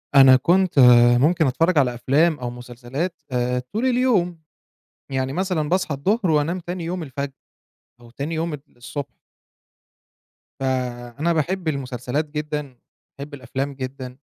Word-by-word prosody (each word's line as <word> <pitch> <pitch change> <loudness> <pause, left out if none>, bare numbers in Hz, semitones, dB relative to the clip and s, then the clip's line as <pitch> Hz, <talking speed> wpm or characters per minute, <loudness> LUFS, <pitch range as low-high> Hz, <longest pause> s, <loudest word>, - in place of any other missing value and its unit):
أنا 135 -1 +9
كنت، 175 +6 +2
آآ 120 -2 +7
ممكن 155 +4 +3
أتفرج 165 +6 +1
على 130 -4 +3
أفلام 145 +6 +2
أو 125 - -3
مسلسلات، 125 +8 -5
آآ 125 0 0
طول 225 +4 0
اليوم. 235 -10 +1 0.7
يعني 130 0 -2
مثلًا 180 -4 -1
باصحى 180 -4 0
الضهر 190 - +1
وأنام 155 +4 +1
تاني 175 0 -5
يوم 175 +1 -3
الفجر، 140 -1 -5 0.7
أو 120 - -15
تاني 140 +7 -4
يوم 165 0 -2
ال 150 - -5 0.2
الصبح. 120 +4 -6 1.5
فأنا 130 +3 -2
باحب 170 +3 -1
المسلسلات 135 0 -2
جدًا، 150 -3 -4 0.4
باحب 140 +2 -8
الأفلام 135 +1 -4
جدًا. 130 -1 -7
140 Hz, 135 wpm, -22 LUFS, 125-170 Hz, 1.5 s, أنا